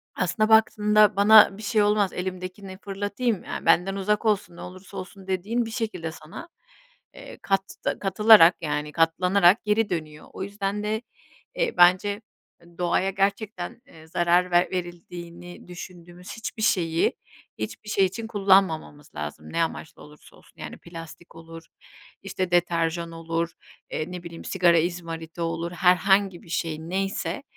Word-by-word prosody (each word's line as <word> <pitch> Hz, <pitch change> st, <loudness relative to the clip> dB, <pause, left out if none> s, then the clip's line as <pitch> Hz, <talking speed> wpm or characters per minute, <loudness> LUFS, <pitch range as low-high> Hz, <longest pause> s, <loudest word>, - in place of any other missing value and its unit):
aslında 200 Hz, +5 st, 0 dB
baktığında 210 Hz, -1 st, +4 dB
bana 205 Hz, 0 st, +7 dB
bir 215 Hz, -, -10 dB
şey 215 Hz, 0 st, +1 dB
olmaz 205 Hz, -2 st, +2 dB
elimdekini 185 Hz, +1 st, -6 dB
fırlatayım, 205 Hz, +2 st, -2 dB
ya -, -, -6 dB
benden 180 Hz, +4 st, +3 dB
uzak 210 Hz, +3 st, -1 dB
olsun, 195 Hz, -5 st, 0 dB
ne -, -, -11 dB
olursa 185 Hz, +2 st, -10 dB
olsun 190 Hz, +1 st, -9 dB
dediğin 205 Hz, +6 st, -1 dB
bir 225 Hz, -, -7 dB
şekilde 185 Hz, -9 st, -4 dB
sana, 175 Hz, -, -11 dB, 0.7 s
eee, -, -, -12 dB
katta 195 Hz, 0 st, -2 dB
katılarak 195 Hz, -2 st, +6 dB
yani 150 Hz, -1 st, -3 dB
katlanarak 180 Hz, +4 st, +3 dB
geri 210 Hz, +1 st, +1 dB
dönüyor. 155 Hz, -3 st, -5 dB
O -, -, -5 dB
yüzden 200 Hz, +1 st, -3 dB
de, 215 Hz, +1 st, -2 dB, 0.5 s
eee, -, -, 0 dB
bence 190 Hz, +4 st, +4 dB, 0.6 s
doğaya 180 Hz, +2 st, +1 dB
gerçekten, 200 Hz, +1 st, -2 dB
eee, 160 Hz, 0 st, -16 dB
zarar 175 Hz, +2 st, +2 dB
ver 175 Hz, +1 st, +3 dB
verildiğini 175 Hz, 0 st, -8 dB
düşündüğümüz 180 Hz, 0 st, -11 dB
hiçbir 220 Hz, 0 st, -6 dB
şeyi, 165 Hz, -5 st, +1 dB, 0.5 s
hiçbir 110 Hz, -, -6 dB
şey 195 Hz, -2 st, +3 dB
için 220 Hz, +5 st, -5 dB
kullanmamamız 190 Hz, -8 st, +1 dB
lazım, 75 Hz, +1 st, -7 dB
ne 170 Hz, -, +2 dB
amaçla 160 Hz, -1 st, -6 dB
olursa 150 Hz, 0 st, -17 dB
olsun. -, -, -18 dB
Yani -, -, -7 dB
plastik 165 Hz, 0 st, -12 dB
olur, 165 Hz, 0 st, -11 dB, 0.6 s
işte 185 Hz, -2 st, -3 dB
deterjan 170 Hz, -1 st, 0 dB
olur, 165 Hz, 0 st, -3 dB, 0.4 s
eee, 155 Hz, +3 st, -4 dB
ne 180 Hz, -1 st, -7 dB
bileyim 170 Hz, -1 st, -10 dB
sigara 175 Hz, -3 st, +3 dB
izmariti 165 Hz, -1 st, -5 dB
olur, 165 Hz, +1 st, -3 dB
herhangi 185 Hz, +1 st, +2 dB
bir 170 Hz, -, -17 dB
şey 160 Hz, -1 st, -2 dB
neyse, 195 Hz, -, -3 dB
180 Hz, 140 wpm, -25 LUFS, 170-200 Hz, 0.7 s, bana